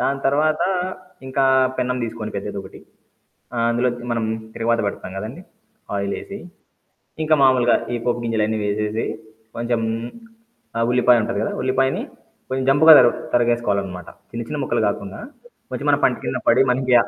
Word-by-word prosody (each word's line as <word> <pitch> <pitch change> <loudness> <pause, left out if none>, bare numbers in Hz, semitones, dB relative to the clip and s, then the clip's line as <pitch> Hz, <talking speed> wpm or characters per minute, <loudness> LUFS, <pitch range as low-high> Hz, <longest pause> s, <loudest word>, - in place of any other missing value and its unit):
దాని 135 0 0
తరువాత 155 +3 +2 0.6
ఇంకా 135 +1 0 0.4
పెన్నం 125 0 0
తీసుకొని 110 -1 -6
పెద్దదొకటి 100 -1 -6 0.8
ఆహ్, 115 - +2
అందు‌లోకి 120 0 -1
మనం 115 -1 -1 0.3
తిరగమాత 115 0 +1
పెడతాం 95 - -7
కదండీ 120 - -7 0.6
ఆయిలేసి. 100 - -4 0.8
ఇంకా 155 0 +3
మాములుగా 130 -3 +5 0.2
ఈ - - 0
పోపు 120 -1 0
గింజలన్నీ 110 -1 0
వేసేసి 105 +2 -1 0.5
కొంచెం 120 0 -1 1.0
ఆహ్, 115 0 +2
ఉల్లిపాయుంటది 120 -4 +3
కదా! - - -2
ఉల్లిపాయని 130 +1 +1 0.5
కొంచెం 130 0 -2
జంపుగా 160 +3 +7
తర 125 - +7 0.3
తరగేసుకోవాలనమాట. 105 -7 0 0.2
చిన్న 120 0 -4
చిన్న 150 - -4
ముక్కలు 120 -3 0
కాకుండా 100 -1 -5 0.5
కొంచెం - - -4
మన - - +5
పంటి - - +2
కింద - - -2
పడి 125 +3 +6
మనకి 130 0 0
120 Hz, 135 wpm, -21 LUFS, 110-130 Hz, 1.0 s, జంపుగా